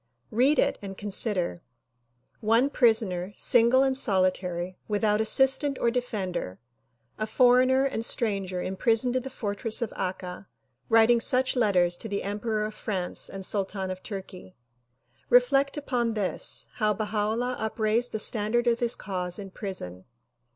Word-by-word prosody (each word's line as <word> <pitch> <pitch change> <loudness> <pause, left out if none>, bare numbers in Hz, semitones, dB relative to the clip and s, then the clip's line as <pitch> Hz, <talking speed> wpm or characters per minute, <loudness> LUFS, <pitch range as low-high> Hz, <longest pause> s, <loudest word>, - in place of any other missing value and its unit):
Read 255 +7 +3
it - - +1
and 195 -1 -8
consider: 200 -4 -2 0.8
One 230 +6 +2
prisoner, 210 -7 +1
single 245 +2 +4
and 265 -1 +1
solitary, 185 -5 -1
without 210 0 +1
assistant 265 +5 +4
or 235 - +1
defender, 195 - -4 0.6
a 215 - -2
foreigner 255 +3 +4
and 245 -5 -2
stranger 195 -6 0
imprisoned 230 +6 0
in 255 - +1
the 265 - -7
fortress 215 -1 -2
of 235 - -3
Akka 185 0 -5 0.4
writing 230 +1 +5
such 255 +2 +1
letters 185 -7 +2
to 225 - -5
the 200 0 -3
emperor 210 +2 -2
of 215 - -6
France 190 -5 -3
and 195 -1 -5
sultan 195 -1 -2
of 185 0 -7
Tui'key. 190 -2 -9 0.7
Reflect 275 +4 +3
upon 240 -5 -1
this, 200 -3 -1
how 215 -2 +1
Baha 210 0 -1
'Ullah 245 +2 -2
upraised 220 +2 0
the - - -2
standard 215 +2 +1
of 235 -1 +2
his 240 0 +1
cause 180 -3 -4
in 195 -2 -8
prison. 95 - -7
215 Hz, 145 wpm, -26 LUFS, 190-240 Hz, 0.8 s, writing